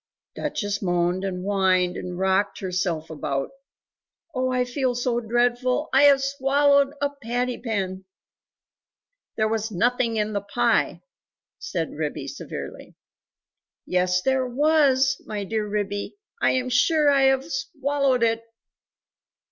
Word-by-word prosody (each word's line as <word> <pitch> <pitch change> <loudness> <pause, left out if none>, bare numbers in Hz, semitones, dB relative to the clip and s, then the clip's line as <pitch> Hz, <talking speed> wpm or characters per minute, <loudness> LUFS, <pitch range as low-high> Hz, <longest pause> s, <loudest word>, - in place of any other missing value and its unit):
Duchess 205 -1 -3
moaned 175 0 0
and 180 -2 -3
whined 185 -2 +2
and 180 -1 -6
rocked 190 +2 +1
herself 180 -4 -2
about. 140 - -3 0.8
"Oh 255 -1 0
I 250 0 +1
feel 250 0 -1
so 245 -1 0
dreadful. 245 +4 0
I 275 +2 +6
have 275 -1 +6
swallowed 280 +1 +2
a 285 0 0
patty 245 +2 -2
pan!" 190 -5 -3 1.3
"There 215 - +2
was 220 0 -1
NOTHING 235 +4 +1
in 215 0 -1
the 200 - -1
pie," 230 +4 0 0.6
said 475 - -3
Ribby - - -4
severely. - - -8 0.9
"Yes 180 0 +1
there 265 -1 +1
WAS, 270 -1 +3
my 210 -1 -3
dear 215 +1 -2
Ribby, 205 - -3 0.3
I - - +3
am 255 -1 -1
sure 295 +4 +3
I 275 -1 +4
have 265 0 +3
swallowed 275 -3 0
it!" 225 0 +1
240 Hz, 125 wpm, -24 LUFS, 195-265 Hz, 1.3 s, I